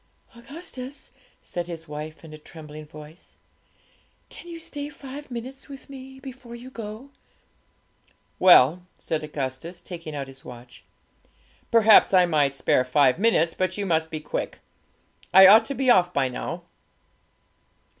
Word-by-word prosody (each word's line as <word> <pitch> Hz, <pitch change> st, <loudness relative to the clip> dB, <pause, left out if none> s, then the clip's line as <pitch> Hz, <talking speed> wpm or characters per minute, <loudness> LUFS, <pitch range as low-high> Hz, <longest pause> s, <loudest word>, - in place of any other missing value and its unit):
'Augustus,' 270 Hz, +1 st, -9 dB, 0.3 s
said 175 Hz, -1 st, -5 dB
his 165 Hz, -2 st, -8 dB
wife, 155 Hz, +2 st, -8 dB
in 155 Hz, -, -12 dB
a -, -, -9 dB
trembling 155 Hz, -1 st, -11 dB
voice, 155 Hz, +2 st, -14 dB, 0.9 s
'can -, -, -13 dB
you 335 Hz, -1 st, -8 dB
stay 290 Hz, -2 st, -6 dB
five 285 Hz, 0 st, -10 dB
minutes 255 Hz, +3 st, -8 dB
with 275 Hz, 0 st, -11 dB
me 265 Hz, 0 st, -11 dB
before 255 Hz, -3 st, -10 dB
you 250 Hz, +2 st, -11 dB
go?' 230 Hz, +4 st, -8 dB, 1.3 s
'Well,' 175 Hz, -2 st, +6 dB, 0.2 s
said 155 Hz, -1 st, -3 dB
Augustus, 150 Hz, +3 st, -5 dB
taking 165 Hz, -4 st, -8 dB
out 140 Hz, -1 st, -4 dB
his 135 Hz, 0 st, -13 dB
watch, 120 Hz, 0 st, -13 dB, 0.9 s
'perhaps 220 Hz, -3 st, +6 dB
I 180 Hz, -1 st, +6 dB
might 145 Hz, -5 st, +1 dB
spare 130 Hz, -, +2 dB
five 130 Hz, +2 st, +3 dB
minutes; 195 Hz, -7 st, +2 dB
but 185 Hz, 0 st, -2 dB
you 205 Hz, -, -2 dB
must 160 Hz, -3 st, 0 dB
be 155 Hz, -, -5 dB
quick. 150 Hz, -, -4 dB, 0.8 s
I 190 Hz, 0 st, +10 dB
ought 220 Hz, +4 st, +8 dB
to 275 Hz, -, -4 dB
be 260 Hz, -1 st, +3 dB
off 180 Hz, -4 st, +4 dB
by 135 Hz, -5 st, 0 dB
now.' 125 Hz, -, -6 dB
180 Hz, 145 wpm, -24 LUFS, 150-255 Hz, 1.3 s, I